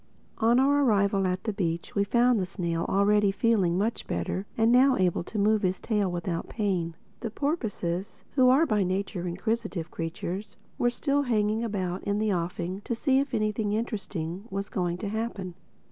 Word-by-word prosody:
On 230 +2 +4
our 285 +2 +4
arrival 200 -5 +3
at 185 0 -2
the 215 - -2
beach 170 -4 -2
we 200 - +2
found 240 +3 +3
the 185 - 0
snail 170 -3 -2
already 200 +1 +3
feeling 195 -5 +2
much 220 +4 -1
better 135 - -2
and 225 +1 +4
now 255 +1 +5
able 180 -2 +1
to 220 - -6
move 210 +1 +3
his 185 -1 0
tail 205 -5 0
without 175 -1 -3
pain. 185 -7 -1 0.2
The 230 - -3
porpoises 210 - -3
(who 255 -2 +5
are 275 +6 +5
by 215 -8 +1
nature 185 -1 -2
inquisitive 195 -1 -2
creatures) 180 +5 -5 0.2
were 240 - +3
still 280 +3 0
hanging 220 -3 +1
about 190 -5 -2
in 205 0 0
the 215 -1 +1
offing 175 +2 -3
to 235 - -1
see 265 +2 +2
if 275 -2 -1
anything 215 -1 0
of - - +2
interest 215 -4 -4 0.3
was 200 +1 -4
going 175 -2 -1
to 200 - -4
happen. 215 -4 -3
205 Hz, 180 wpm, -27 LUFS, 185-230 Hz, 0.3 s, now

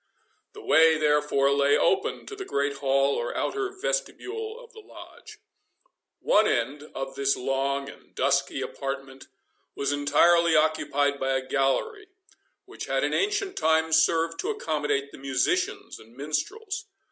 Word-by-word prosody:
The - - -11
way, 160 +1 +5
therefore, 150 -2 +2
lay 140 0 +3
open - - 0
to 415 - -8
the 400 - -6
great 140 - -2
hall 135 0 +2
or 120 - -3
outer 400 -1 -1
vestibule 445 0 -4
of - - -15
the 445 - -12
Lodge. 430 0 -13 0.8
One - - +3
end 145 +2 -1
of 135 0 -4
this 140 0 0
long 135 +2 -1
and - - -14
dusky 140 0 0
apartment 135 -1 -6 0.5
was 140 0 -1
entirely 160 +4 +4
occupied 145 -2 +1
by 135 0 0
a 130 0 -3
gallery, 145 - -1 0.6
which - - -8
had - - 0
in - - 0
ancient 400 -1 0
times 160 0 +2
served 165 0 0
to 410 - -2
accommodate 150 - -2
the - - -12
musicians 365 - -1
and 115 +3 -18
minstrels. 395 - -4
150 Hz, 145 wpm, -26 LUFS, -, 0.8 s, way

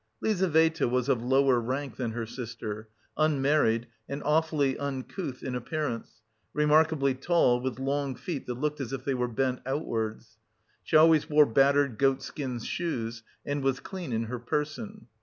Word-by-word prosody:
Lizaveta 160 - +2
was 125 0 0
of 120 - +2
lower 130 0 +3
rank 130 +4 -3
than 120 -3 -2
her 115 -1 -3
sister, 110 -2 -6 0.3
unmarried 140 -6 +2 0.2
and 140 +1 -4
awfully 150 -3 +2
uncouth 140 +1 -4
in 130 - -3
appearance, 125 -3 -4 0.3
remarkably 150 -2 +3
tall 130 -3 +2
with 130 -1 -3
long 135 0 -1
feet 160 -1 -5
that 125 - -3
looked 150 +3 -2
as 125 -2 -4
if 130 -1 -5
they 135 - +1
were 125 -1 0
bent 125 +2 -1
outwards. 110 -5 -3 0.4
She - - -2
always 160 -1 +5
wore 150 0 +6
battered 140 -1 +3
goatskin 135 -1 0
shoes, 115 -8 -3 0.2
and 145 0 -2
was 135 -1 +1
clean 185 -7 -6
in 115 0 0
her 120 +2 -5
person. 155 - -3
135 Hz, 155 wpm, -28 LUFS, 120-150 Hz, 0.4 s, wore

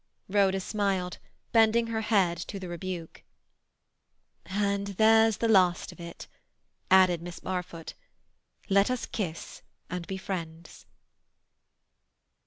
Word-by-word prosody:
Rhoda 195 -1 +2
smiled, 190 -3 -2 0.3
bending 225 0 +4
her 225 -1 -2
head 200 -6 +2
to 200 - -6
the 185 - -7
rebuke. 175 -1 -6 1.3
"And 200 0 -1
there's 220 0 +5
the 230 - 0
last 185 -5 +3
of - - -16
it," 170 0 -9 0.6
added 185 -3 +5
Miss 175 0 -8
Barfoot. 180 -3 -5 0.7
"Let 200 +1 +3
us 255 -1 -2
kiss 175 -7 -5 0.3
and 180 -2 -4
be 190 - -4
friends." 170 -4 -7
190 Hz, 110 wpm, -28 LUFS, 175-210 Hz, 1.3 s, there's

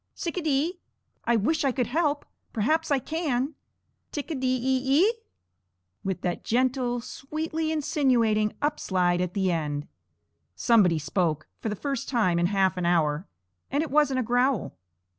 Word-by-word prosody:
"Tsic 340 0 -4
a - - 0
dee. 310 +3 0 0.5
I 235 - +3
wish 280 +10 +1
I 275 - +3
could 250 -1 0
help. 290 +3 0 0.3
Perhaps 310 +10 +1
I 285 - +3
can. 285 -1 -1 0.6
Tic 295 +2 -4
a - - 0
dee 255 -2 0
e 265 +6 +3
e?" 440 - +4 0.9
with 190 -1 -2
that 175 -1 -2
gentle, 245 0 +1
sweetly 315 +5 -3
insinuating 245 -9 +2
up 295 +1 0
slide 180 -2 +1
at 180 -1 -3
the 190 -2 +2
end. 150 -3 -2 0.7
Somebody 190 - +4
spoke, 155 -1 -1
for 225 - -3
the 210 - -2
first 275 +3 -3
time 200 -9 +2
in 175 - +3
half 190 -1 +2
an 180 - -1
hour, 160 -1 +1 0.4
and 285 +3 +1
it 320 - -6
wasn't 290 -3 +3
a - - +1
growl. 245 -1 +1
250 Hz, 160 wpm, -27 LUFS, 190-290 Hz, 0.9 s, e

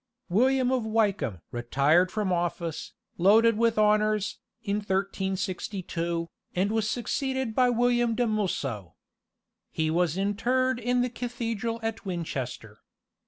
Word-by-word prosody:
William 255 +6 +3
of 260 -1 +1
Wykeham 205 - 0
retired 140 +9 +2
from 210 -4 0
office, 170 -2 -3 0.3
loaded 220 +5 +5
with 230 0 +2
honours, 215 0 +2 0.2
in 205 -1 0
1362, 190 -3 -2 0.3
and 190 +3 +1
was 220 -1 0
succeeded 260 +1 -2
by 250 +2 +4
William 240 -1 +2
de 245 - +1
Mulso. 135 - -2 0.7
He 160 0 -1
was 175 0 +1
interred 240 +6 +1
in 245 +1 +1
the 250 - -1
cathedral 230 -2 -3
at 225 0 -3
Winchester. 135 - -5
210 Hz, 120 wpm, -27 LUFS, 175-230 Hz, 0.7 s, loaded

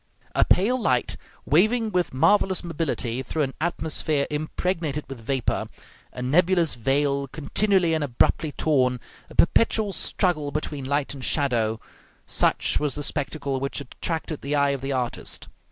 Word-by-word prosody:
A - - +4
pale 240 +7 +2
light, 125 - +1 0.3
waving 220 - +3
with 180 -2 0
marvelous 185 +7 +3
mobility 145 -7 -2
through 150 +4 -2
an 135 -1 -3
atmosphere 155 -3 0
impregnated 155 0 -2
with 135 -4 -8
vapor, 130 +2 -1 0.4
a 125 - -6
nebulous 170 +4 +3
veil 140 +3 +1
continually 170 +6 +1
and 160 -1 0
abruptly 145 +4 +1
torn, 130 -5 +1 0.3
a - - -13
perpetual 215 +2 +3
struggle 160 -8 0
between 145 -1 -4
light 140 +1 0
and 135 -2 -9
shadow, 115 -5 +1 0.5
such - - +1
was 150 -3 -1
the 145 - -4
spectacle 140 -1 -2
which 135 +1 -3
attracted 155 +3 -4
the 140 +2 -2
eye 140 -1 +3
of 140 -2 -3
the 135 +1 -3
artist. 125 -3 -2
145 Hz, 145 wpm, -24 LUFS, 135-170 Hz, 0.5 s, A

